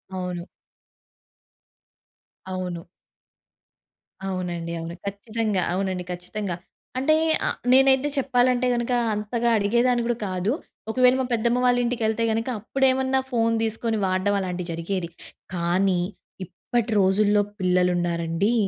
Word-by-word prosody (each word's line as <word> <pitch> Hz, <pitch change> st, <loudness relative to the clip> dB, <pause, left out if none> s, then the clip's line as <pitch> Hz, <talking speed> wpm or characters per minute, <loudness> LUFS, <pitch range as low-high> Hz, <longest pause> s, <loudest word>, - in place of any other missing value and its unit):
అవును. 180 Hz, -1 st, -4 dB, 2.0 s
అవును. 185 Hz, -2 st, -4 dB, 1.5 s
అవునండి. 175 Hz, -3 st, -3 dB
అవును. 165 Hz, +1 st, -6 dB
ఖచ్చితంగా. 210 Hz, 0 st, -1 dB
అవునండి. 185 Hz, -1 st, -1 dB
ఖచ్చితంగా. 180 Hz, +1 st, -4 dB, 0.4 s
అంటే 290 Hz, +4 st, +3 dB, 0.3 s
అ -, -, +3 dB, 0.2 s
నేనైతే 265 Hz, +1 st, +5 dB
చెప్పాలంటే 250 Hz, -1 st, +2 dB
గనుక 235 Hz, +1 st, -2 dB, 0.2 s
అంతగా 230 Hz, +3 st, -1 dB
అడిగేదాన్ని 235 Hz, +4 st, +2 dB
కూడా 240 Hz, -1 st, 0 dB
కాదు. 185 Hz, +3 st, -1 dB, 0.4 s
ఒకవేళ 250 Hz, +1 st, +5 dB
మా 260 Hz, -, 0 dB
పెద్దమ్మ 235 Hz, +1 st, +2 dB
వాళ్ళింటికెళ్తే 235 Hz, -2 st, +1 dB
గనుక 225 Hz, +2 st, -1 dB
అప్పుడేమన్నా 265 Hz, +3 st, +1 dB
ఫోన్ 230 Hz, -1 st, +2 dB
తీసుకొని 225 Hz, 0 st, 0 dB
వాడడం 185 Hz, +2 st, +1 dB
అలాంటివి 180 Hz, -2 st, -4 dB
జరిగేది. 170 Hz, +1 st, -3 dB, 0.5 s
కానీ 180 Hz, +2 st, +2 dB, 0.5 s
ఇప్పటి 230 Hz, +6 st, -3 dB
రోజుల్లో 205 Hz, +2 st, +3 dB, 0.2 s
పిల్లలున్నారండి 180 Hz, +1 st, +1 dB
205 Hz, 100 wpm, -24 LUFS, 180-240 Hz, 2.0 s, నేనైతే